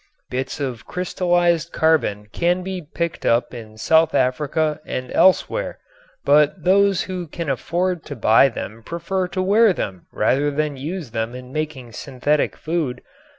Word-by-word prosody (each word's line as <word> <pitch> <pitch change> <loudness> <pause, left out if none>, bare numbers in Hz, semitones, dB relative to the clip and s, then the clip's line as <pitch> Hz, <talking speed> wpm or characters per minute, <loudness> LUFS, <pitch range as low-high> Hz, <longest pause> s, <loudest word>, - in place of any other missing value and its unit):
Bits 130 +1 -3
of 130 -5 -4
crystallized 175 -2 +1
carbon 155 -11 +1
can 175 +1 +1
be 190 -1 -4
picked 170 +2 -4
up 120 +1 +2
in 110 -3 -10
South 160 +8 +3
Africa 150 +4 +1
and 130 -4 -5
elsewhere, 345 - +2 0.5
but 150 +3 +4
those 195 +1 +4
who 180 -2 -5
can 160 -1 -3
afford 175 +6 -1
to 145 - -6
buy 115 +3 +5
them 115 -2 -7
prefer 170 +6 -2
to 185 +1 -2
wear 210 +2 +5
them 95 - -5
rather 145 +3 +1
than 150 0 -1
use 150 0 -5
them 115 +1 -3
in 125 +1 -10
making 150 -6 -4
synthetic 140 +5 -1
food. 155 -7 -2
155 Hz, 150 wpm, -21 LUFS, 125-175 Hz, 0.5 s, buy